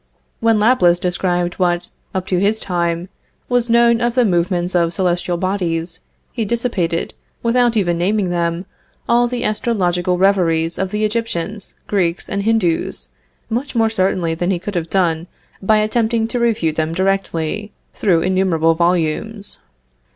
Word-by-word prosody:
When 225 -1 +3
Laplace 210 -6 +4
described 175 0 -1
what, 175 -1 +1 0.2
up 185 -1 -1
to 185 -2 0
his 205 +3 +2
time, 170 -2 -1 0.4
was 245 -1 +1
known 235 0 +4
of 240 0 0
the 250 -2 +4
movements 175 -1 0
of 170 -1 +1
celestial 175 -1 0
bodies, 175 -2 -2 0.3
he 230 - -2
dissipated, 205 -7 -1 0.3
without 240 0 +2
even 175 -4 +1
naming 190 +1 +1
them, 170 +1 -1 0.4
all 240 +1 +3
the 245 0 -3
astrological 185 -6 0
reveries 170 -4 +2
of 190 0 -1
the 210 +2 0
Egyptians, 215 -2 -3
Greeks, 180 -4 -1
and 200 - -2
Hindoos, 185 - 0 0.4
much 250 +4 -3
more 225 -1 +2
certainly 185 -5 0
than 175 +2 -2
he 190 - +1
could 205 +4 -6
have 170 -3 -2
done 170 -3 +1 0.3
by 215 +2 +3
attempting 225 +1 +1
to 245 - -2
refute 215 -10 +1
them 160 0 0
directly, 195 +1 -1 0.2
through 175 -5 +2
innumerable 185 -3 +2
volumes. 175 +5 -1
185 Hz, 145 wpm, -18 LUFS, 175-220 Hz, 0.4 s, Laplace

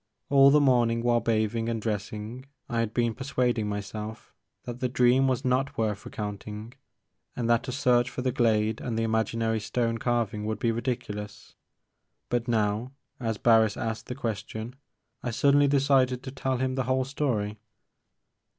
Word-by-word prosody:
All 140 -1 +7
the 150 +2 +6
morning 120 -4 +3
while 120 -1 +3
bathing 115 0 0
and 115 -1 -1
dressing 110 +4 -4 0.2
I 115 - -1
had 115 -2 0
been 120 -1 +1
persuading 125 -4 -1
myself 105 +2 -6 0.3
that 120 0 -6
the 130 -1 0
dream 125 +2 +4
was 130 +1 0
not 135 +2 0
worth 105 -2 -1
recounting 105 -1 -6 0.6
and 120 -2 -2
that 115 -1 +2
a - - -2
search 125 -2 +2
for 125 0 -5
the 130 - +1
glade 110 -3 +1
and 120 -3 -3
the 115 - +1
imaginary 110 0 0
stone 115 +2 -1
carving 115 -4 -1
would 110 - -1
be 115 -2 +1
ridiculous. 110 -3 -4 0.8
But 120 0 -1
now, 110 +2 0 0.3
as 115 -3 -2
Barris 110 -2 +4
asked 115 -1 -4
the 125 - -4
question, 110 -1 -4 0.5
I 125 - -3
suddenly 140 +4 +4
decided 135 -2 +2
to 130 - -6
tell 130 -1 -2
him 130 +1 -1
the 130 -1 -1
whole 130 0 +1
story. 115 -7 -2
120 Hz, 160 wpm, -27 LUFS, 110-130 Hz, 0.8 s, All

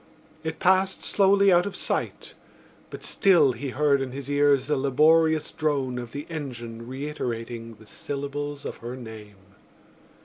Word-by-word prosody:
It 160 0 -4
passed 190 +1 +2
slowly 200 0 +4
out 175 +3 +4
of 200 - -5
sight; - - -3 0.6
but - - -9
still 180 -9 +4
he 140 +2 -5
heard 140 +1 +2
in 130 -1 -4
his 140 +1 -6
ears 145 -2 +3
the 150 - 0
laborious 155 +4 +3
drone 135 -5 -1
of 120 -2 -7
the 145 +1 -6
engine 120 -7 -7
reiterating 120 -4 -5
the 110 +1 -17
syllables 145 +4 -5
of - - -5
her 120 +2 -7
name. 110 -4 -10
140 Hz, 145 wpm, -25 LUFS, 125-155 Hz, 0.6 s, slowly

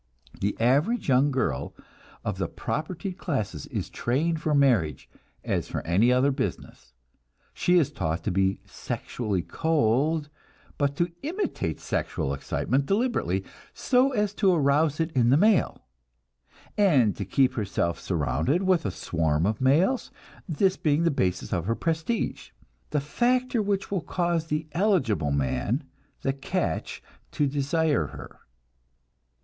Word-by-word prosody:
The 100 +1 -1
average 140 - +2
young 135 +2 +4
girl 125 - -2 0.5
of - - -3
the - - 0
propertied 180 +5 -4
classes 135 - -3
is - - -4
trained 155 +6 -1
for 155 -2 +1
marriage 120 - +2 0.4
as - - -1
for - - -4
any 100 +9 +3
other 130 +3 +3
business. 130 - -5 0.6
She 180 0 +3
is 160 -6 +2
taught 80 +1 -2
to 105 - -1
be 95 +1 +1
sexually 105 -7 -3
cold, 150 0 +1 0.5
but 140 -1 +1
to 170 +3 0
imitate 325 - -3
sexual 70 - -2
excitement 130 - -1
deliberately, 240 - 0 0.3
so 260 +1 +3
as 210 -5 0
to 195 -3 +5
arouse 150 -1 +2
it 160 0 0
in 120 -5 +3
the 135 - +5
male, 205 - +2 0.9
and 140 - +4
to 100 - -4
keep 130 +6 +2
herself 100 -7 -1
surrounded 80 - 0
with 185 - +2
a - - 0
swarm 80 -3 0
of 105 +3 -1
males; 170 - +3 0.4
this 185 +4 +2
being 150 +1 +1
the 170 - +3
basis 95 -9 -1
of 85 -3 -1
her 115 - +1
prestige, 165 - -2 0.4
the 150 - +1
factor 245 - +1
which 200 -1 -1
will 195 -4 0
cause 170 -2 -1
the 150 0 -2
"eligible" 155 - +1
man, 70 - 0 0.4
the 135 - +1
"catch," 135 - -3 0.3
to 145 - +1
desire 145 +2 +1
her. - - -11
145 Hz, 140 wpm, -26 LUFS, 110-175 Hz, 0.9 s, to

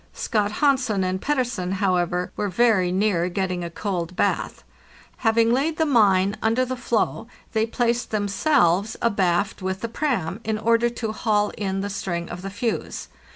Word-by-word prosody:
Scott 210 -2 -1
Hansen 255 -8 +2
and 185 +1 -2
Pettersen, 245 -10 -1
however, 180 -2 0
were 205 - -1
very 195 -3 +3
near 185 -2 +1
getting 185 -1 -2
a 170 - -4
cold 180 -1 -4
bath. - - -1 0.5
Having 230 0 +3
laid 300 +5 0
the 320 - +2
mine 205 -7 +3
under 225 +3 +2
the 255 +1 -3
floe, 250 - -1 0.3
they 220 0 +1
placed 240 +1 0
themselves 205 - +1
abaft 195 -3 +1
with 190 +1 -3
the 230 - -2
"pram," 225 - -2
* - - -27
in 220 0 -1
order 230 +2 +2
to 230 -2 -4
haul 210 -2 +1
in 195 -2 -2
the 200 - -3
string 170 -3 -3
of 175 - -7
the 195 - -5
fuse. 225 +4 -3
210 Hz, 165 wpm, -23 LUFS, 185-235 Hz, 0.5 s, very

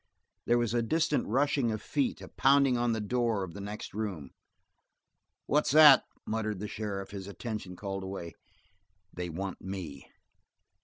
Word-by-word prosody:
There 120 - +4
was 120 -2 0
a 120 - +2
distant 155 +5 +1
rushing 135 0 +1
of 110 - -2
feet, 140 +3 -1
a - - -8
pounding 135 -1 +4
on 120 0 +1
the 110 - -1
door 115 -1 0
of 90 -3 -7
the 100 - -7
next 105 +2 -7
room. 95 -10 -4 1.1
"What's 150 +1 +2
that?" 150 -3 +9 0.2
muttered 110 -2 -2
the 105 +3 -5
sheriff, 100 -2 -5
his 100 -1 -7
attention 100 -1 -6
called 95 +1 -5
away. 95 -3 -6 0.8
"They 90 0 -4
want 95 +3 -5
me." 90 -8 -7
105 Hz, 155 wpm, -30 LUFS, 95-120 Hz, 1.1 s, that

